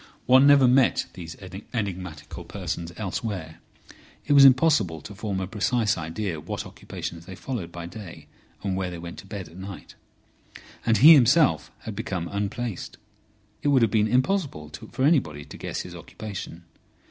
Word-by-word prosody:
One 130 Hz, +3 st, +7 dB
never 140 Hz, -2 st, +7 dB
met 130 Hz, +1 st, +4 dB
these 85 Hz, -2 st, -8 dB, 0.4 s
enigmatical 90 Hz, -8 st, -5 dB
persons 85 Hz, -3 st, -5 dB
elsewhere. 95 Hz, -5 st, -4 dB, 0.7 s
It 145 Hz, -, +2 dB
was 140 Hz, -1 st, +9 dB
impossible 130 Hz, -, +4 dB
to 105 Hz, -, -9 dB
form 100 Hz, -1 st, -3 dB
a 95 Hz, -, -2 dB
precise 110 Hz, +2 st, +1 dB
idea 85 Hz, +1 st, -4 dB
what -, -, -5 dB
occupations 85 Hz, 0 st, -7 dB
they 95 Hz, -, -8 dB
followed 115 Hz, -6 st, -5 dB
by 85 Hz, 0 st, -7 dB
day 90 Hz, 0 st, -10 dB, 0.4 s
and 95 Hz, -2 st, -1 dB
where 95 Hz, -1 st, -2 dB
they 90 Hz, -, -6 dB
went 85 Hz, 0 st, -8 dB
to 95 Hz, -, -12 dB
bed 95 Hz, -3 st, -6 dB
at 85 Hz, -, -14 dB
night. 95 Hz, 0 st, -9 dB, 0.9 s
And 110 Hz, -1 st, +4 dB
he 155 Hz, +5 st, +10 dB
himself 145 Hz, +2 st, +4 dB
had 110 Hz, -, -6 dB
become 95 Hz, -5 st, -3 dB
unplaced. 105 Hz, +1 st, -4 dB, 0.6 s
It -, -, -1 dB
would 135 Hz, -4 st, +5 dB
have 110 Hz, -, +2 dB
been 110 Hz, -1 st, +3 dB
impossible 130 Hz, -, 0 dB, 0.2 s
for 130 Hz, -, -2 dB
anybody 80 Hz, -, +2 dB
to -, -, -11 dB
guess -, -, -4 dB
his 90 Hz, -, -9 dB
occupation. 90 Hz, 0 st, -8 dB
100 Hz, 160 wpm, -25 LUFS, 85-125 Hz, 0.9 s, he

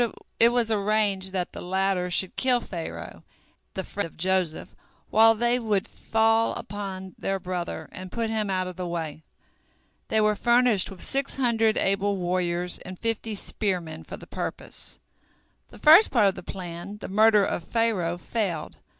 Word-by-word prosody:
It 230 Hz, -, +7 dB
was 240 Hz, -2 st, +1 dB
arranged 205 Hz, -2 st, +1 dB
that 180 Hz, -2 st, -2 dB
the -, -, -8 dB
latter 190 Hz, 0 st, 0 dB
should 180 Hz, +1 st, 0 dB
kill 255 Hz, -2 st, +3 dB
Pharaoh, 170 Hz, -7 st, -7 dB, 0.5 s
the 190 Hz, -, -2 dB
friend 200 Hz, -1 st, -4 dB
of -, -, -19 dB
Joseph, 185 Hz, -2 st, 0 dB, 0.4 s
while 225 Hz, +1 st, +6 dB
they 240 Hz, +2 st, +2 dB
would 210 Hz, -5 st, 0 dB
fall 225 Hz, 0 st, +1 dB
upon 190 Hz, -2 st, -6 dB
their 195 Hz, 0 st, -1 dB
brother, 175 Hz, -3 st, -4 dB
and 185 Hz, 0 st, -9 dB
put 230 Hz, -1 st, -1 dB
him 215 Hz, -2 st, -1 dB
out 185 Hz, -1 st, 0 dB
of 185 Hz, -1 st, -7 dB
the 180 Hz, -1 st, -3 dB
way. 160 Hz, -3 st, -4 dB, 0.9 s
They 220 Hz, -, +1 dB
were 215 Hz, 0 st, +3 dB
furnished 240 Hz, -3 st, +3 dB
with 190 Hz, -3 st, -8 dB
six 275 Hz, 0 st, -1 dB
hundred 225 Hz, -4 st, +2 dB
able 195 Hz, +1 st, +1 dB
warriors 180 Hz, -1 st, -1 dB
and 185 Hz, 0 st, -9 dB
fifty 225 Hz, 0 st, -2 dB
spearmen 180 Hz, -6 st, -2 dB
for -, -, -8 dB
the -, -, -12 dB
purpose. -, -, -5 dB, 0.7 s
The -, -, -15 dB
first 325 Hz, +8 st, +8 dB
part 230 Hz, -5 st, +3 dB
of 195 Hz, -, +4 dB
the -, -, -8 dB
plan, 180 Hz, +2 st, -7 dB
the -, -, -7 dB
murder 210 Hz, 0 st, +5 dB
of 175 Hz, -, -2 dB
Pharaoh, 195 Hz, -6 st, 0 dB
failed. 180 Hz, -4 st, -3 dB
195 Hz, 165 wpm, -26 LUFS, 180-225 Hz, 0.9 s, first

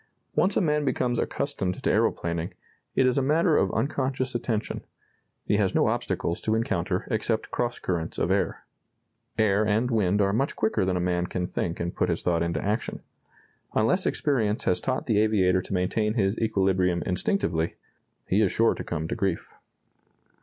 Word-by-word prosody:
Once 190 Hz, +2 st, +2 dB
a -, -, +3 dB
man 150 Hz, -3 st, +1 dB
becomes 125 Hz, -3 st, 0 dB
accustomed 95 Hz, -10 st, -2 dB
to -, -, +2 dB
aeroplaning, 85 Hz, 0 st, 0 dB, 0.4 s
it 130 Hz, -, +4 dB
is 130 Hz, +2 st, +3 dB
a -, -, +1 dB
matter 155 Hz, +4 st, +3 dB
of -, -, +2 dB
unconscious 130 Hz, -2 st, -1 dB
attention.... 115 Hz, -2 st, -2 dB, 0.6 s
He -, -, +2 dB
has -, -, +1 dB
no -, -, +4 dB
obstacles 85 Hz, -, -2 dB
to 110 Hz, -, +1 dB
encounter 95 Hz, -5 st, -1 dB
except 110 Hz, 0 st, -1 dB
cross 120 Hz, 0 st, -1 dB
currents 85 Hz, -3 st, -3 dB
of -, -, 0 dB
air. -, -, 0 dB, 0.7 s
Air 110 Hz, -2 st, +3 dB
and 110 Hz, +4 st, +1 dB
wind 105 Hz, -3 st, +2 dB
are 100 Hz, -1 st, +2 dB
much 135 Hz, +6 st, 0 dB
quicker 110 Hz, -3 st, +1 dB
than 95 Hz, -1 st, 0 dB
a -, -, 0 dB
man 90 Hz, 0 st, 0 dB
can 90 Hz, 0 st, -2 dB
think 85 Hz, -1 st, -3 dB
and 85 Hz, +1 st, -3 dB
put 90 Hz, -, +1 dB
his 85 Hz, -, -1 dB
thought 85 Hz, -2 st, +1 dB
into 85 Hz, 0 st, -1 dB
action. 105 Hz, +2 st, -2 dB, 0.7 s
Unless 115 Hz, -, +2 dB
experience 115 Hz, -8 st, 0 dB
has 90 Hz, -, +1 dB
taught 130 Hz, 0 st, -1 dB
the 110 Hz, -4 st, +2 dB
aviator 95 Hz, -4 st, +3 dB
to -, -, -11 dB
maintain 105 Hz, +4 st, 0 dB
his 100 Hz, -3 st, +1 dB
equilibrium 95 Hz, -5 st, +1 dB
instinctively, 90 Hz, -, 0 dB, 0.5 s
he 100 Hz, +3 st, +2 dB
is 100 Hz, -, +3 dB
sure 115 Hz, 0 st, +3 dB
to -, -, -6 dB
come 80 Hz, -1 st, -3 dB
to -, -, -3 dB
grief." 95 Hz, -4 st, -2 dB
105 Hz, 175 wpm, -26 LUFS, 90-120 Hz, 0.7 s, it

